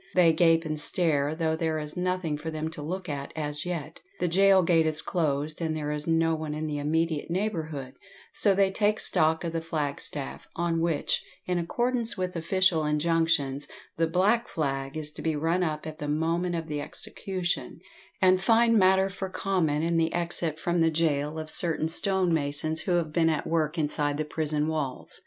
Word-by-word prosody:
They 170 -3 +5
gape 165 0 +3
and 155 -1 -2
stare, 150 -2 +2
though 160 -1 0
there 160 -1 -1
is 150 -1 -4
nothing 180 -3 -1
for 150 +2 -5
them 155 0 -4
to 150 - -7
look 180 +5 -4
at 140 -2 -5
as 150 0 -3
yet; 160 -3 -5 0.2
the 180 - +1
gaol 190 +2 +5
gate 165 -2 +3
is 155 0 +3
closed, 155 -2 -1
and 160 -1 -1
there 150 -1 -3
is 150 +1 -4
no 165 0 +2
one 155 -1 -3
in 155 +1 -3
the 150 -1 -3
immediate 160 +1 -1
neighbourhood, 160 -8 -3 0.4
so 200 -2 +3
they 195 0 +3
take 210 +1 +1
stock 160 +1 +2
of 165 -1 -3
the 165 - -1
flagstaff, 145 -3 -4
on 170 -1 0
which, 165 -3 0 0.2
in 180 -1 0
accordance 240 +6 0
with 185 -1 -3
official 170 -1 +2
injunctions, 150 -2 +1 0.3
the 165 0 +2
"black 205 +8 +2
flag" 135 -2 -3
is 150 -1 -2
to - - -9
be 160 -1 0
run 165 +4 0
up 155 -2 -3
at 155 -1 -7
the 150 - -4
moment 165 +4 0
of 165 -1 -4
the 150 -2 -3
execution, 190 -1 -4 0.4
and 185 0 +5
find 230 +1 +4
matter 190 0 +4
for 195 -1 -5
comment 170 -6 0
in 170 0 +1
the 165 0 +2
exit 170 -2 0
from 175 0 0
the 165 - +4
gaol 155 -1 0
of 155 0 -5
certain 160 0 +1
stonemasons 160 -4 +1
who 180 - -1
have 165 -3 0
been 165 -1 +3
at 155 -2 -1
work 160 0 0
inside 145 -1 +1
the 155 - -2
prison 150 -1 -1
walls. 150 -5 -3
160 Hz, 190 wpm, -27 LUFS, 150-180 Hz, 0.4 s, They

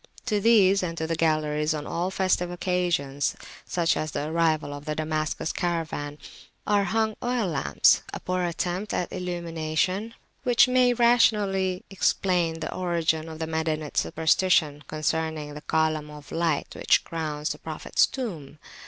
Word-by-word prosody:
To 215 -4 +1
these 200 -3 +5
and 170 -2 -3
to 160 - -2
the 165 +1 -1
galleries 155 -1 +1
on 150 -1 -5
all 175 +4 -2
festive 185 -2 +1
occasions, 175 -6 -1 0.3
such 170 -2 +1
as 155 - -2
the 150 +1 -3
arrival 160 -3 +1
of 145 0 -8
the 155 -1 -2
Damascus 155 0 -2
caravan, 160 -4 -2 0.5
are 205 -1 +2
hung 220 0 0
oil 245 -2 0
lamps 155 -7 +3
a - - -5
poor 185 0 -2
attempt 175 +3 -2
at 180 - -2
illumination, 175 +3 -2 0.3
which 245 -1 +5
may 250 -1 +4
rationally 210 -6 +2
explain 175 -4 +1
the - - -4
origin 165 -3 0
of 160 - -8
the 160 - -3
Madinite 160 -2 -2
superstition 160 -2 +2
concerning 155 -1 -2
the 150 - -8
column 155 -1 0
of 150 -2 -12
light 165 -3 -1
which - - +2
crowns 155 -2 -3
the - - -6
Prophet's - - +1
tomb. 175 - -6
165 Hz, 150 wpm, -26 LUFS, 155-185 Hz, 0.5 s, these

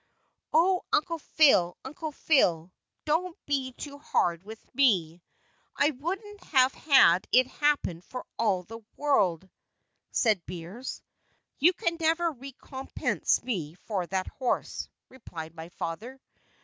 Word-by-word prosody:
"Oh, 360 +3 +4
Uncle 330 +2 +1 0.2
Phile, 190 - +6
Uncle 305 +3 -5
Phile, 180 - +2 0.3
don't 330 +3 0
be 270 -3 -1
too 285 +2 -8
hard 170 - 0
with 220 +3 -10
me; 185 - +2 0.6
I 290 - +3
wouldn't 385 - -5
have 260 -2 +4
had 225 - +5
it 255 +1 +6
happen 285 - 0
for 250 +7 -8
all 200 -5 +2
the 225 +5 -9 0.2
world," 190 - +2 0.6
said 215 -7 +2
Beers. 180 +9 -7 0.6
"You 345 +6 +5
can 335 -1 -1
never 330 +1 +2
recompense 270 0 -2
me 170 -11 -3
for 190 -2 -4
that 190 0 -1
horse," 255 -2 -3 0.2
replied 165 -11 -9
my 165 0 -9
father. 225 +11 -6
255 Hz, 125 wpm, -28 LUFS, 180-300 Hz, 0.6 s, Phile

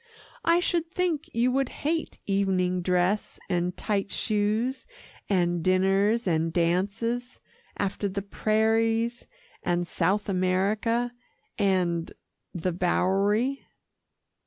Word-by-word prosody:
"I 335 +1 +4
should 340 -2 0
think 340 -4 -1
you 240 +2 +2
would 270 0 +1
hate 320 +2 -2
evening 185 -2 +1
dress 180 +3 0
and 175 0 0
tight 200 -2 -1
shoes 220 +6 -1 0.4
and 175 -3 +1
dinners 195 +5 +3
and 165 -2 +1
dances, 200 +9 -1 0.4
after 200 0 -1
the 200 +1 -4
prairies 225 +3 +1 0.3
and 175 -1 0
South 195 +6 0
America 205 +6 +1 0.5
and 180 -4 +1 0.4
the 180 +1 -2
Bowery." 200 +8 +1
200 Hz, 100 wpm, -27 LUFS, 185-230 Hz, 0.5 s, I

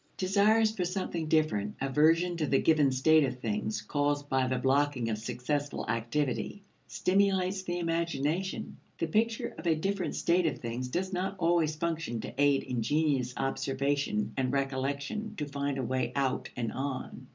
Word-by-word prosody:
Desires 210 +4 +3
for 185 - -1
something 175 -3 -2
different, 155 -11 +1
aversion 160 +6 +3
to 155 -3 0
the 135 - +3
given 150 -4 +4
state 155 +4 +4
of 130 -2 -1
things 110 -1 -2
caused 145 +3 0
by 130 -1 +2
the 130 0 0
blocking 130 -2 +1
of 105 - -2
successful 145 +6 -3
activity, 125 - -1 0.2
stimulates 190 0 +1
the 175 -2 -3
imagination. 170 +1 -1 0.2
The 165 - 0
picture 225 +7 0
of - - -5
a 160 - +4
different 195 +3 -2
state 175 0 +2
of 155 - -1
things 120 +2 -4
does 185 +8 -2
not 185 +2 -1
always 165 -3 +2
function 165 -7 -2
to - - -7
aid 145 -1 +4
ingenious 130 +1 0
observation 135 -4 -1
and 130 -2 +1
recollection 140 +10 -2
to 150 - -3
find 140 -1 -2
a 135 - -1
way 130 +2 -1
out 135 -2 0
and 115 -2 -2
on. 135 -1 -5
145 Hz, 160 wpm, -30 LUFS, 130-175 Hz, 0.2 s, given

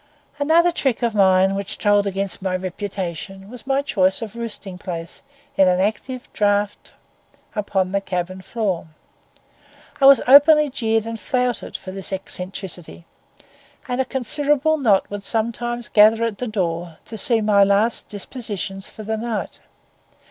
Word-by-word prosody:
Another 330 +4 +4
trick 265 -8 -1
of 235 -2 +1
mine 190 -1 +4
which 200 +1 -4
told 205 -1 +3
against 195 -1 -2
my 185 -1 -1
reputation 190 +1 -5
was 250 0 -11
my 275 +1 +1
choice 195 -5 +1
of 220 0 -8
roosting 210 -5 -5
place 170 -3 -6 0.4
in 190 - +6
an 180 0 +3
active 220 +6 -2
draught 205 0 0 0.6
upon 195 -3 -1
the 200 0 0
cabin 185 0 -4
floor. 190 -5 -2 1.1
I 270 - +8
was 275 -3 +8
openly 290 +2 +7
jeered 225 -4 0
and 230 0 -5
flouted 250 0 -2
for 185 - -9
this 195 0 -4
eccentricity; 185 - -7 0.8
and 250 +1 0
a - - -1
considerable 290 +5 +1
knot 215 -8 +3
would 205 0 -4
sometimes 235 +3 -2
gather 220 +2 +5
at 230 -3 -2
the 250 - -3
door 170 -5 -3
to 225 - -8
see 225 +2 +2
my 210 -2 +4
last 200 +4 +1
dispositions 205 -3 -6
for 215 - -10
the 220 +1 -2
night. 225 -1 -4
210 Hz, 150 wpm, -21 LUFS, 190-240 Hz, 1.1 s, I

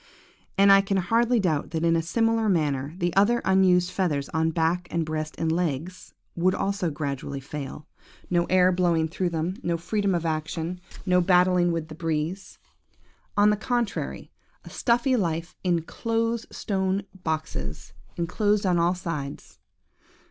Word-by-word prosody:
"And 200 0 +6
I 195 0 +8
can 195 0 -1
hardly 230 +5 +2
doubt 160 -7 0
that 160 0 -2
in 165 0 +3
a 165 - +2
similar 225 +5 +1
manner, 150 -4 0
the 175 -2 -1
other 215 +5 +4
unused 185 -2 +4
feathers 150 -8 -1
on 160 0 +1
back 165 +2 0
and 165 -1 -1
breast 155 0 -4
and 165 -1 0
legs, 170 +1 -3 0.2
would 185 +2 +2
also 195 -3 -1
gradually 140 -2 -4
fail. 140 +1 -7 0.4
No 175 -1 +1
air 185 0 +4
blowing 170 -3 +2
through 175 +3 -2
them, 170 +3 -2
no 170 -1 -1
freedom 200 +2 0
of 170 -1 -2
action, 160 +2 -3 0.2
no 180 -1 +4
battling 180 -1 +4
with 165 -2 -2
the 155 - -9
breeze. 165 +3 -3 0.8
On 205 +1 +6
the - - +2
contrary, 240 +1 -2 0.3
a - - -10
stuffy 245 +2 +2
life 170 -5 -2
in 175 -3 +1
close 230 +4 -2
stone 190 -1 -1 0.2
boxes, 155 - -4 0.2
enclosed 205 +4 +1
on 180 -2 +2
all 175 +2 +2
sides. 150 -6 -6
175 Hz, 155 wpm, -26 LUFS, 160-195 Hz, 0.8 s, I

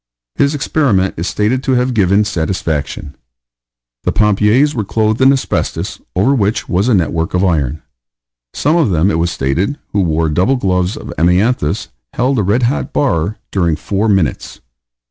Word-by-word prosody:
His 140 +1 +1
experiment 130 -10 +1
is 85 +3 -3
stated 110 +5 0
to 135 - 0
have 125 0 +1
given 100 -1 +3
satisfaction. 80 -6 -3 0.9
The - - 0
pompiers 105 +7 +2
were 110 - -2
clothed 110 +3 0
in 135 +1 +6
asbestos, 135 -1 -2
over 100 +10 +3
which 105 -3 0
was 100 +6 +1
a 120 - +4
network 80 -1 -1
of 90 - +1
iron. 75 -4 -1 0.7
Some 155 +4 +1
of 160 -9 +2
them, 90 +2 +2
it 80 - 0
was 85 +1 +1
stated, 85 - -1 0.2
who 100 - +2
wore 80 -2 +1
double 90 - +2
gloves 90 -5 0
of - - -8
amianthus, 90 +1 +1 0.3
held 130 0 +1
a - - +1
red 105 +7 +1
hot 125 +5 -1
bar 105 - 0
during 85 -5 +1
four 100 +6 -1
minutes. 95 -6 -1
100 Hz, 165 wpm, -15 LUFS, 85-125 Hz, 0.9 s, in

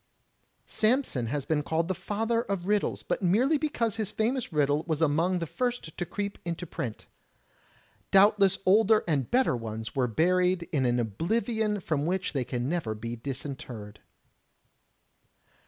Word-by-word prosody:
Samson 220 - +1
has 140 +3 -2
been 155 -2 +1
called 160 +2 -1
the 190 - 0
Father 225 +5 -1
of 195 -5 -3
Riddles, 210 0 0
but - - -2
merely 245 - +3
because 235 -8 -1
his 215 -3 -2
famous 235 +3 -1
riddle 145 0 +2
was 160 -2 0
among 165 +4 +2
the 170 - -2
first 245 -3 -3
to 175 - -3
creep 200 0 -4
into 170 +1 -4
print. 120 -8 -5 1.0
Doubtless 195 0 +5
older 215 +3 +5
and 140 -6 0
better 255 - +3
ones 110 -1 -5
were 130 -2 +2
buried 180 - +2
in 135 -5 +1
an 120 0 +1
oblivion 210 - 0
from 155 -4 -1
which 185 0 -1
they 135 -3 0
can 120 0 -3
never 150 -9 -1
be 115 +2 -5
disinterred. 125 -4 -7
170 Hz, 150 wpm, -28 LUFS, 135-210 Hz, 1.0 s, Doubtless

